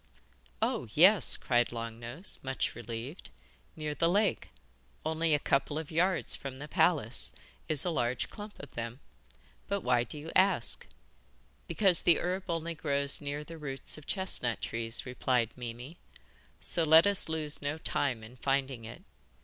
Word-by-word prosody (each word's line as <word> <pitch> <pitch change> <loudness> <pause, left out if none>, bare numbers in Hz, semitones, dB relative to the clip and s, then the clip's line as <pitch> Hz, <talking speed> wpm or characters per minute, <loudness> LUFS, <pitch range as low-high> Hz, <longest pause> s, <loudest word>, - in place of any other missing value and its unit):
'Oh, 125 - -1
yes!' 185 +5 +6
cried 120 -1 +1
Long 115 -1 -6
Nose, 120 - -2
much 135 0 -2
relieved; 120 - -7 0.5
'near 155 -1 -4
the 165 +3 +1
lake 205 +3 +1 0.6
only 160 0 +1
a - - +3
couple 145 +1 0
of 160 -2 -5
hundred 160 - -9
yards 180 +1 +2
from 135 -2 -7
the 145 +2 -8
palace 145 - +1 0.4
is 150 0 -1
a 175 - 0
large 120 -5 -1
clump 210 0 -10
of 140 - -11
them. 115 +2 -6 0.7
But 200 -1 -1
why 125 -4 +2
do 125 - -7
you 155 +2 -7
ask?' 185 -9 +2 0.8
'Because 180 0 +4
the 170 - +5
herb 185 +2 -3
only 165 0 -2
grows 140 -2 +2
near 145 +1 -4
the 165 +1 -10
roots 135 -3 -3
of 155 - -13
chestnut 185 - +3
trees,' 115 0 -2
replied 125 -2 0
Mimi; 125 +6 -8 0.6
'so 170 - -2
let 160 +1 +7
us 200 -4 +3
lose 155 -2 0
no 145 +2 -2
time 130 -7 -1
in 120 +3 -12
finding 135 -3 -1
it. 115 - -10
145 Hz, 160 wpm, -31 LUFS, 125-165 Hz, 0.8 s, let